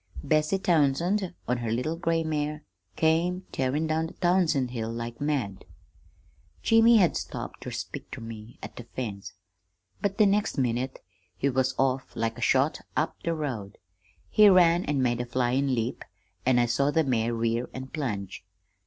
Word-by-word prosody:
Bessie 155 +5 +2
Townsend, 175 +3 +1
on 125 - +1
her 120 -1 -3
little 125 +8 -1
gray 165 -1 0
mare, 150 -1 -2 0.3
came 175 +3 +1
tearin' 135 +4 0
down 160 +1 0
the - - -11
Townsend 170 -8 +2
Hill 115 -2 -3
like 115 +1 -6
mad. 135 -10 -1 1.0
"Jimmy 225 +1 +6
had 180 -5 +4
stopped - - -5
ter - - -6
speak - - -6
ter - - -7
me, 115 0 -9
at - - -8
the 120 - -8
fence, 100 -7 -6 0.7
but 200 -1 -1
the 215 - +6
next 200 -3 +1
minute 130 0 -1 0.3
he 140 - +1
was 130 0 0
off 135 -1 0
like 115 +1 -2
a - - -8
shot 135 +5 +2 0.2
up 160 - 0
the 165 0 -1
road. 120 -10 -4 0.5
He 210 -1 +7
ran 175 -2 +5
an' 140 -3 0
made 120 -1 +1
a - - -3
flyin' 130 +2 +1
leap, 115 +1 -2 0.4
an' 130 -1 +4
I 120 - +4
saw 140 +4 +1
the 160 +2 +2
mare 120 -4 0
rear 115 +1 -1
and 130 0 -8
plunge. 105 - -4
135 Hz, 170 wpm, -27 LUFS, 120-165 Hz, 1.0 s, He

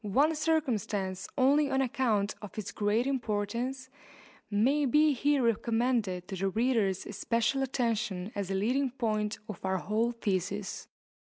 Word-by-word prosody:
One 275 +10 +3
circumstance, 225 - -1
only 280 +2 +4
on 265 - +1
account 230 -6 +1
of 210 -1 -10
its 210 -2 -4
great 210 +3 +1
importance, 245 +1 -2 0.6
may 265 +8 +2
be 300 +4 +4
here 280 +1 +2
recommended 230 -5 0
to 195 - -4
the 195 +1 0
reader's 220 -3 +1
especial 230 +5 0
attention 225 -7 -1
as 200 -2 -3
a 195 - -1
leading 255 +8 +1
point 215 -4 -1
of 210 - -8
our 190 0 0
whole 215 +6 0
thesis. 200 -3 -3
225 Hz, 140 wpm, -30 LUFS, 205-260 Hz, 0.6 s, only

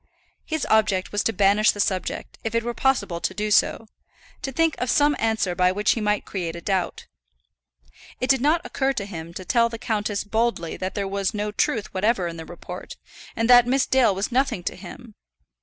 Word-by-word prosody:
His 315 -3 -2
object 215 -4 +2
was 205 - 0
to - - +2
banish 205 +1 +3
the 205 - 0
subject, 190 -2 -2
if 225 0 -3
it 230 - +1
were 240 0 -3
possible 205 -11 0
to 185 - -2
do 210 0 -2
so; 225 - +3 0.6
to 270 - -4
think 325 +4 +2
of 250 - -2
some 290 +3 +3
answer 220 -5 0
by 180 +1 +3
which 205 +3 +1
he 230 - -1
might 210 0 0
create 170 -4 -4
a - - -6
doubt. 190 -1 -2 1.1
It 255 - -1
did 265 -2 +3
not 320 +5 +2
occur 270 0 0
to 200 -6 -3
him 170 -4 -7
to 185 - -7
tell 235 +2 +3
the 230 - -6
countess 210 -3 -2
boldly 220 -5 -1
that 185 +1 -5
there 200 -2 -2
was 195 0 -2
no 210 0 -2
truth 210 0 -1
whatever 195 0 +1
in 170 -1 -5
the 160 - -7
report, 175 - -9 0.4
and 225 0 0
that 245 -1 +8
Miss 265 +1 +2
Dale 255 -7 +3
was 195 +6 -2
nothing 250 -7 0
to - - -3
him. 215 +5 -11
210 Hz, 205 wpm, -24 LUFS, 190-240 Hz, 1.1 s, that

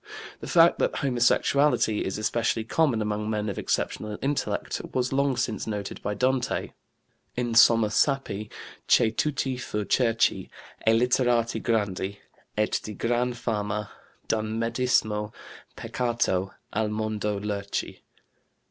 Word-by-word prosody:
The - - -8
fact 170 0 +5
that - - +1
homosexuality 130 -2 +2
is 95 - -2
especially 115 +1 0
common 120 -2 +1
among 105 0 -2
men 105 -1 -1
of 100 - -4
exceptional 105 -1 -2
intellect 140 +1 -2
was 125 0 0
long 140 -1 +1
since 115 -3 -2
noted 105 -2 -4
by 105 - -2
Dante: 130 +1 0 0.7
"In 120 -1 -1
somma 115 -2 +6
sappi, 110 -5 0 0.4
che 110 - +5
tutti 135 +1 -1
fur 105 -4 -3
cherci 115 -1 +2 0.4
E - - +7
litterati 120 0 +2
grandi, 100 -3 -1 0.4
et 105 0 +1
di 105 - -7
gran 120 +3 0
fama 105 -3 -3 0.4
D'un 110 0 -1
medismo 115 -3 0 0.4
peccato 115 -6 -1 0.2
al 110 0 0
mondo 105 -1 -2
lerci." 100 -1 -3
115 Hz, 120 wpm, -26 LUFS, 105-125 Hz, 0.7 s, E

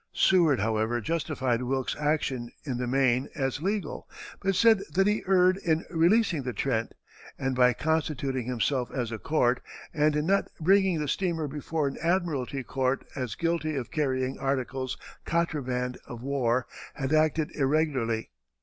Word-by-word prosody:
Seward, 165 -9 +4
however, 110 +3 0
justified 130 -3 -1
Wilkes's 130 +1 -1
action 140 -5 0
in 130 -5 -3
the 125 - -2
main 130 0 +2
as 135 -1 -1
legal, 195 -2 -3 0.3
but 195 0 0
said 220 +1 +5
that 195 +2 +3
he 210 +1 +2
erred 185 -1 +4
in 165 -3 0
releasing 175 0 +3
the 125 -1 -4
Trent; 115 -4 -1 0.4
and 135 -1 -1
by 125 0 +5
constituting 140 -4 -1
himself 125 +1 0
as 120 -3 -3
a 110 - -4
court, 125 - +1 0.3
and 150 0 +2
in 150 0 0
not 195 +3 +2
bringing 190 0 +3
the 150 - -2
steamer 165 -1 -1
before 150 +1 -2
an 135 - -4
admiralty 160 -7 0
court 130 +1 -1
as 125 -6 -3
guilty 165 -2 -1
of 130 -4 -4
carrying 130 -4 -1
articles 130 -1 -2 0.3
contraband 130 -7 -1
of 120 0 -8
war, 130 -3 +1 0.3
had 135 +1 -2
acted 155 0 +2
irregularly. 135 -6 0
140 Hz, 150 wpm, -28 LUFS, 125-165 Hz, 0.4 s, said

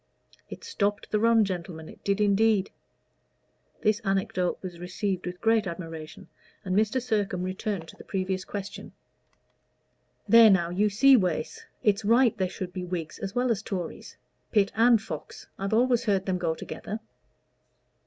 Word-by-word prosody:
It - - -9
stopped 205 - -2
the 210 - +2
run, 230 -1 +4
gentlemen 170 -4 -5
it - - -14
did 200 0 0
indeed." 210 -1 +3 1.1
This 215 0 +3
anecodote 195 -1 0
was 175 -2 -7
received 185 +1 -3
with 180 0 -6
great 225 -2 +2
admiration, 165 -3 -8 0.4
but 185 -2 -3
Mr. 215 +5 +2
Sircome 205 -7 -1
returned 185 -1 -3
to - - -12
the - - -13
previous 190 -1 -2
question. 200 +1 -7 1.3
"There 230 -1 +8
now, 175 -4 +3
you 205 +4 +2
see, 270 +7 +6
Wace 180 -8 -1 0.2
it's 205 -1 +2
right 235 +2 +4
there 185 -1 +1
should 180 -1 -6
be 185 - -4
Whigs 175 -3 -5
as 195 - -5
well 245 0 +2
as 215 -3 0
Tories 185 -6 -6 0.3
Pitt 205 -3 +3
and 230 +1 +5
Fox 175 -8 -8
I've 195 0 -2
always 240 +1 +2
heard 195 -2 +1
them 185 -1 -1
go 165 -2 -1
together." 215 +6 -6
200 Hz, 155 wpm, -27 LUFS, 180-220 Hz, 1.3 s, There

